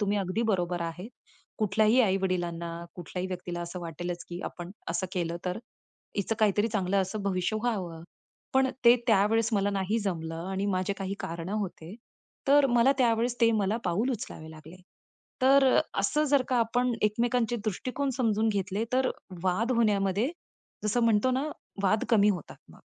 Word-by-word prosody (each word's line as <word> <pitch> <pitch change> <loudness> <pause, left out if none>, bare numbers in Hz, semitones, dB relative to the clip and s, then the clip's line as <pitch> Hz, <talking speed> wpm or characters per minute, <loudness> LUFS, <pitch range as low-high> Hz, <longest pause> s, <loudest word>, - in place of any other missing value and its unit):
तुम्ही 205 0 +1
अगदी 195 +4 -1
बरोबर 175 -2 -1
आहे. 170 +5 -5 0.5
कुठल्याही 215 +3 +3
आई-वडिलांना 180 -4 0 0.3
कुठल्याही 180 +1 -5
व्यक्तीला 175 -1 -5
असं 175 +1 -6
वाटेलच 175 +1 -5
की 175 0 -6
आपण 175 0 -6 0.2
असं 185 +2 -1
केलं 170 -2 -2
तर, 180 +3 -2 0.6
हिच 200 +2 -1
काहीतरी 210 +1 +3
चांगलं 200 -3 0
असं 200 +2 -4
भविष्य 195 +2 0
व्हावं. 185 -9 -2 0.5
पण 265 0 +5 0.2
ते 235 0 +9
त्यावेळेस 220 +2 +3
मला 200 -1 +2
नाही 200 +3 0
जमलं 165 -4 -3
आणि 195 +1 -1
माझे 185 0 0
काही 195 0 -3
कारण 170 +1 -5
होते. 195 -4 -4 0.5
तर 285 0 +6
मला 245 +4 +5
त्यावेळेस 235 0 +2
ते 230 -1 +6
मला 210 -1 +1
पाऊल 200 +9 +1
उचलावे 160 -8 -6
लागले. 160 +2 -12 0.7
तर 275 +1 +6
अ, - - +6 0.2
असं 300 +10 +1
जर 285 -2 +3
का 255 - +1
आपण 245 +2 +1
एकमेकांचे 235 +2 +1
दृष्टिकोन 255 +7 -2
समजून 220 -2 +2
घेतले, 200 +1 -1
तर 260 0 +2 0.3
वाद 220 +7 +1
होण्यामध्ये 210 0 +2 0.5
जसं 215 +3 +1
म्हणतो 230 +2 +3
ना 275 +4 0 0.3
वाद 210 +3 +2
कमी 210 -2 +5
होतात 180 -6 -5
मग. - - -17
200 Hz, 155 wpm, -28 LUFS, 180-230 Hz, 0.7 s, ते